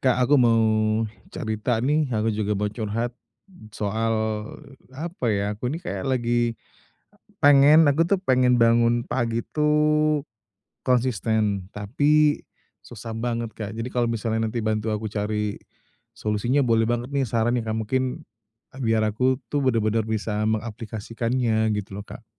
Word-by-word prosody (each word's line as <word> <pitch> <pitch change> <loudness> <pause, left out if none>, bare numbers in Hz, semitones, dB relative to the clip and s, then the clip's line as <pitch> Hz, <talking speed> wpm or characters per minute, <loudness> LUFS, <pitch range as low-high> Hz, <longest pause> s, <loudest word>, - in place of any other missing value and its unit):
Kak, 130 -2 +2
aku 145 +4 +3
mau 115 -2 +4 0.7
cerita 110 +2 -2
nih, 150 +1 +2
aku 110 -2 0
juga 105 -1 -1
mau 105 +1 0
curhat 115 +2 -3 0.6
soal, 110 +2 -1 0.8
apa 165 -1 -4
ya, 100 -1 0
aku 125 +4 -3
nih 160 +5 -4
kayak - - -4
lagi 120 -2 0
e - - -35 0.7
pengen 145 +2 +7
aku 160 +4 +2
tuh 195 +2 +2
pengen 125 -5 +3
bangun 115 +1 +4
pagi 115 -2 -1
tuh 150 0 +2 0.6
konsisten, 110 -6 0
tapi 145 +9 +2 0.4
susah 115 -1 -8
banget 115 0 -3
Kak. 105 -1 -6
Jadi, 115 - -3
kalau 120 -1 +1
misalnya 110 -1 -1
nanti 120 - -3
bantu 110 0 -1
aku 110 +1 -2
cari 105 0 -2 0.6
solusinya 115 +6 0
boleh 115 -1 +3
banget 120 +2 -2
nih, 140 - +2
saran 115 +2 +1
nih 120 - 0
Kak, 110 0 -2
mungkin 130 +2 -2 0.6
biar 110 -2 +2
aku 125 +5 +1
tuh 145 -1 0
benar-benar 115 -3 +1
bisa 110 -1 -2
mengaplikasikannya, 110 +1 -1
gitu 100 -1 -7
loh - - -5
Kak. 115 - -11
115 Hz, 140 wpm, -24 LUFS, 110-130 Hz, 0.8 s, pengen